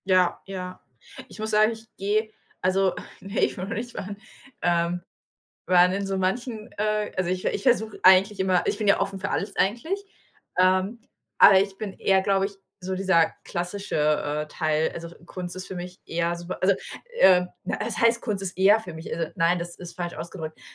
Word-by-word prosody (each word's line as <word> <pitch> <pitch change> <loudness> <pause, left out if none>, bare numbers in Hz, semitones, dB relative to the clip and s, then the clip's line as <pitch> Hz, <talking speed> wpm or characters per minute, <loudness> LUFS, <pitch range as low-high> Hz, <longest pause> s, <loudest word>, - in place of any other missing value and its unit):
Ja, 185 -2 +3
ja. 185 -1 -6 0.5
Ich - - -13
muss 220 0 -2
sagen, 215 +1 +4
ich 225 0 -10
gehe 215 +3 0 0.3
also, 190 0 +2 0.3
ne, 195 +2 -4
ich - - +1
will 185 - -3
noch 195 - -4
nicht 240 +2 -5
fahren, 200 +1 -6 0.4
ähm, 175 0 +1 0.6
weil 180 0 +5
in 200 0 -2
so 195 0 -2
manchen 215 +4 -2
äh, 210 0 0
also 185 -2 0
ich 185 0 -2
ich 200 - -1
versuche 220 -4 +1
eigentlich 190 +2 +6
immer 185 -1 +2
ich - - 0
bin 215 -1 -2
ja 200 - +5
offen 195 0 -2
für 200 - -3
alles 200 0 -2
eigentlich, 315 - 0 0.6
ähm, 185 +5 +3 0.4
aber 195 -1 +9
ich 195 -1 -4
bin 210 -3 -5
eher, 190 0 +2
glaube 195 0 +2
ich, 200 - -5 0.3
so 185 0 -4
dieser 185 -4 +3
klassische, 180 +4 -4 0.5
äh, - - -19
Teil. 155 0 0
Also, 170 0 -7 0.2
Kunst 180 0 -6
ist 185 0 -7
für 190 - -7
mich 180 +1 -7
eher 170 +1 -1
super, 175 +1 -6
also, 195 +1 +4 0.4
äh, 180 -1 +7 0.2
was - - -3
heißt 230 0 +3
Kunst 205 -4 -2
ist 185 -1 -5
eher 200 +3 +6
für 185 -6 -9
mich? 160 +1 -6
Also, 165 -1 -3
nein, 170 +2 +3
das 170 0 -6
ist 175 -1 -10
falsch 175 -1 -4
ausgedrückt. 160 -2 -7
190 Hz, 195 wpm, -25 LUFS, 180-205 Hz, 0.6 s, aber